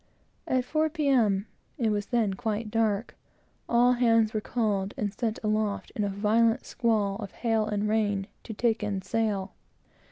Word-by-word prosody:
At 255 Hz, -1 st, +1 dB
four, 310 Hz, +3 st, +1 dB
P. 305 Hz, -2 st, -2 dB
M. 210 Hz, -7 st, +3 dB, 0.3 s
(it 230 Hz, -5 st, +1 dB
was 205 Hz, 0 st, -1 dB
then 230 Hz, -5 st, +1 dB
quite 215 Hz, +2 st, -3 dB
dark) 220 Hz, -1 st, 0 dB, 0.5 s
all 240 Hz, +1 st, +5 dB
hands 230 Hz, -3 st, +3 dB
were 215 Hz, -, -1 dB
called, 205 Hz, -4 st, -1 dB
and 205 Hz, -1 st, -2 dB
sent 225 Hz, 0 st, -2 dB
aloft 215 Hz, -1 st, -1 dB
in 210 Hz, -, 0 dB
a 200 Hz, -, 0 dB
violent 225 Hz, +4 st, +2 dB
squall 215 Hz, -5 st, 0 dB
of 205 Hz, -3 st, -6 dB
hail 225 Hz, -2 st, 0 dB
and 210 Hz, 0 st, -1 dB
rain, 205 Hz, -2 st, +1 dB, 0.2 s
to 225 Hz, -, -6 dB
take 230 Hz, 0 st, +1 dB
in 200 Hz, -2 st, -2 dB
sail. 205 Hz, -1 st, -1 dB
215 Hz, 165 wpm, -28 LUFS, 205-230 Hz, 0.5 s, all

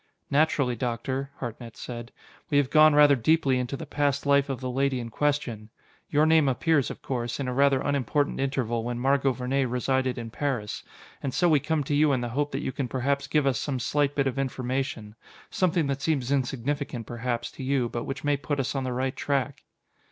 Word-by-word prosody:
"Naturally, 140 Hz, -4 st, +2 dB
Doctor," 130 Hz, +3 st, -3 dB
Hartnett 115 Hz, -1 st, -7 dB
said, 120 Hz, -1 st, -7 dB, 0.4 s
"we 145 Hz, -, +2 dB
have 140 Hz, -3 st, +2 dB
gone 155 Hz, -1 st, +6 dB
rather 145 Hz, -1 st, +7 dB
deeply 135 Hz, 0 st, +2 dB
into 125 Hz, +2 st, -3 dB
the 160 Hz, -, -7 dB
past 145 Hz, -1 st, 0 dB
life 140 Hz, 0 st, +3 dB
of 135 Hz, -3 st, -3 dB
the 130 Hz, -1 st, -3 dB
lady 135 Hz, 0 st, +1 dB
in 115 Hz, -1 st, -5 dB
question. 120 Hz, -5 st, -1 dB, 0.4 s
Your 150 Hz, +1 st, +3 dB
name 160 Hz, -2 st, +4 dB
appears, 140 Hz, +2 st, +2 dB
of -, -, -9 dB
course, 120 Hz, -2 st, -3 dB
in 135 Hz, -, -2 dB
a 125 Hz, -, -1 dB
rather 140 Hz, 0 st, +4 dB
unimportant 145 Hz, +1 st, 0 dB
interval 125 Hz, -4 st, -1 dB
when 120 Hz, 0 st, -3 dB
Margot 135 Hz, +2 st, +2 dB
Vernee 130 Hz, +2 st, 0 dB
resided 130 Hz, +1 st, 0 dB
in 115 Hz, -2 st, -6 dB
Paris. 125 Hz, -6 st, -2 dB, 0.4 s
And 135 Hz, -2 st, -3 dB
so 175 Hz, -, +3 dB
we 155 Hz, -3 st, +5 dB
come 150 Hz, +2 st, -1 dB
to 140 Hz, -, -3 dB
you 145 Hz, 0 st, +4 dB
in 130 Hz, -, 0 dB
the 120 Hz, -, -3 dB
hope 145 Hz, +5 st, -1 dB
that 135 Hz, +2 st, -3 dB
you -, -, -2 dB
can 130 Hz, -1 st, -3 dB
perhaps 140 Hz, +3 st, -1 dB
give 150 Hz, 0 st, +2 dB
us 130 Hz, -4 st, +1 dB
some 140 Hz, -3 st, -2 dB
slight 145 Hz, +3 st, 0 dB
bit 140 Hz, -, +1 dB
of 135 Hz, 0 st, -1 dB
information 130 Hz, -4 st, -3 dB, 0.4 s
something 175 Hz, -3 st, +1 dB
that 140 Hz, 0 st, -2 dB
seems 140 Hz, -5 st, 0 dB
insignificant, 135 Hz, -1 st, -2 dB
perhaps, 120 Hz, 0 st, -3 dB
to -, -, -9 dB
you, 130 Hz, -2 st, +1 dB
but 120 Hz, 0 st, -4 dB
which 140 Hz, +4 st, -5 dB
may 145 Hz, 0 st, +2 dB
put 145 Hz, +1 st, -3 dB
us 130 Hz, -, -1 dB
on 135 Hz, -2 st, -2 dB
the 130 Hz, -1 st, -2 dB
right 130 Hz, +1 st, -1 dB
track." 140 Hz, -1 st, -1 dB
135 Hz, 210 wpm, -27 LUFS, 125-145 Hz, 0.4 s, rather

